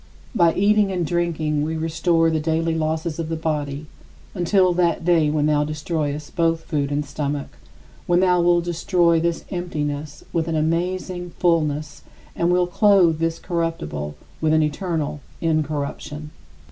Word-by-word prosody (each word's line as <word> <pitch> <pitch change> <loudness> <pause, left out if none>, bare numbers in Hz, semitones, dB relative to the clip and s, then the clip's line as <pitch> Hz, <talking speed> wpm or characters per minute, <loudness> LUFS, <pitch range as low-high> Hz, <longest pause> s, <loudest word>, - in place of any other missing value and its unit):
By 170 -7 +3
eating 205 0 +3
and 180 -2 -1
drinking 160 -3 0
we 160 +2 -2
restore 165 +1 +2
the 160 - +1
daily 165 +1 0
losses 160 0 -2
of 160 -1 -3
the 165 - -1
body 150 -2 -3 0.5
until 185 0 +3
that 170 -2 +1
day 165 -4 +4
when 150 -1 +1
thou 150 -1 +3
destroyest 150 -1 -3
both 165 -1 +2
food 145 -3 -2
and 145 +1 -1
stomach, 145 0 -3 0.6
when 175 0 +4
thou 180 -1 +3
wilt 175 0 +3
destroy 170 -1 +2
this 170 0 -1
emptiness 150 -5 -4
with 165 -1 0
an 165 - -1
amazing 175 +2 -1
fullness 155 -3 0 0.3
and 170 +1 +1
wilt 180 0 +2
clothe 185 -6 +4
this 165 0 0
corruptible 165 - -3 0.3
with 155 -1 +2
an 155 0 +4
eternal 155 -1 -2 0.2
incorruption. 150 -1 -2
165 Hz, 145 wpm, -22 LUFS, 150-175 Hz, 0.6 s, day